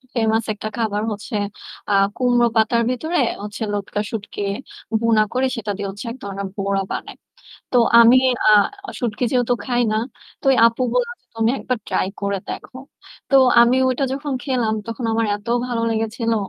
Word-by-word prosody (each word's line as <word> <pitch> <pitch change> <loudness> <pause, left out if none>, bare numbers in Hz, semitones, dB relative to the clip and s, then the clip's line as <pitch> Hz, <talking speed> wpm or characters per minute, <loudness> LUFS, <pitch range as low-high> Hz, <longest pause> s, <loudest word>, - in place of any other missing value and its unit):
Famous 225 -1 +1
একটা 215 +1 -6
খাবার 215 -2 -1
হচ্ছে 210 +1 -6 0.6
আ - - +3 0.2
কুমড়ো 245 -1 +3
পাতার 230 +2 +3
ভেতরে 315 +8 -1 0.2
হচ্ছে 210 +2 -5
লটকা 205 0 -2
শুটকি 210 -2 -5 0.6
ভুনা 225 -2 +4
করে 260 +1 +1
সেটা 215 -3 -3
দিয়ে 205 - -3
হচ্ছে 200 +5 -9
এক 250 - -8
ধরনের 200 0 -4
বড়া 195 0 0
বানায়। - - -5 0.6
তো 250 - +5 0.2
আমি 235 +2 +8 0.3
আ - - +7 0.5
শুটকি 235 0 -2
যেহেতু 245 -1 +2
খাই 245 -1 +1
না। - - +1 0.4
তো - - -15
ওই - - +4
আপু 230 +2 -3
বলল - - +1 0.3
"তুমি 225 0 +2
একবার 255 - -2
ট্রাই - - 0
করে 200 0 -1
দেখো।" 260 - -7 0.5
তো - - +5 0.3
আমি 240 +2 +4
ওইটা 255 +2 0
যখন 280 +1 -3
খেলাম 245 -5 0
তখন 230 +1 -4
আমার 225 0 +1
এত 205 +2 -13 0.2
ভালো 235 -2 -2
লেগেছিলো। 225 +1 -1
230 Hz, 165 wpm, -21 LUFS, 210-250 Hz, 0.6 s, আমি